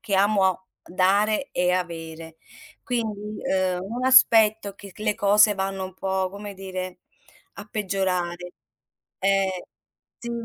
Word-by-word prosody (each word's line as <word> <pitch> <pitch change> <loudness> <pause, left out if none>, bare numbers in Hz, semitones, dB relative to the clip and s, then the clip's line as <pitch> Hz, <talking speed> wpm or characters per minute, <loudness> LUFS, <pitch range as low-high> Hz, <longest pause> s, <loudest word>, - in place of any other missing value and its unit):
che 210 -4 -2
amo 190 -2 +2 0.2
dare 205 +7 +1
e 180 0 +1
avere. 165 -2 -5 0.5
Quindi, 215 -3 -3
uhm, 185 -1 0
un 235 +6 -4
aspetto 220 -5 +5
che 200 -2 -12
c - - -20
le 210 -1 0
cose 210 0 +4
vanno 195 0 -3
un 185 -1 -9
po', 190 -1 -1
come 200 +1 -8
dire, 185 -1 -6 0.6
a 200 - -9
peggiorare. 180 -4 -2 0.7
Eh 195 -1 0 0.5
sì, 235 - -7
195 Hz, 125 wpm, -24 LUFS, 185-210 Hz, 0.7 s, aspetto